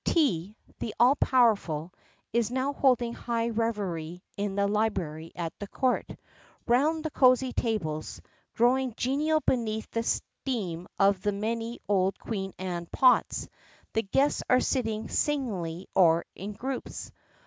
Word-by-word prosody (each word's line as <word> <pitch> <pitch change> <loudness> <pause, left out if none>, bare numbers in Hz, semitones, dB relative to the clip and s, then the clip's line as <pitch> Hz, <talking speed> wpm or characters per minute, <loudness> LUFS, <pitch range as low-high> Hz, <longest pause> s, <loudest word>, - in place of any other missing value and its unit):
Tea, 210 - +1 0.2
the 220 - -4
all 250 +4 +6
powerful, 200 - +2 0.4
is 235 -1 +2
now 260 +3 -1
holding 245 -4 +2
high 235 -1 -1
revelry 195 -7 -2
in 200 -1 -2
the 200 0 +2
library 180 -7 -1
at 170 -2 -3
the 205 - -5
Court. 255 +4 0 0.6
Round 300 +6 +2
the 315 - -1
cosy 255 -1 +4
tables, 160 -10 -2 0.4
growing 250 0 +2
genial 305 +5 +1
beneath 220 -5 -1
the 230 - 0
steam 195 -8 -3
of 195 -1 +3
the 205 - +1
many 225 +3 -3
old 195 -1 +2
Queen 195 -4 -4
Anne 175 -2 -4
"pots," 255 -1 +3 0.5
the 225 - +2
guests 270 +8 +1
are 255 - +6
sitting 225 -5 -1
singly 195 - -1
or 170 -2 +4
in 200 +3 -6
groups. 255 +5 -5
220 Hz, 135 wpm, -28 LUFS, 190-255 Hz, 0.6 s, all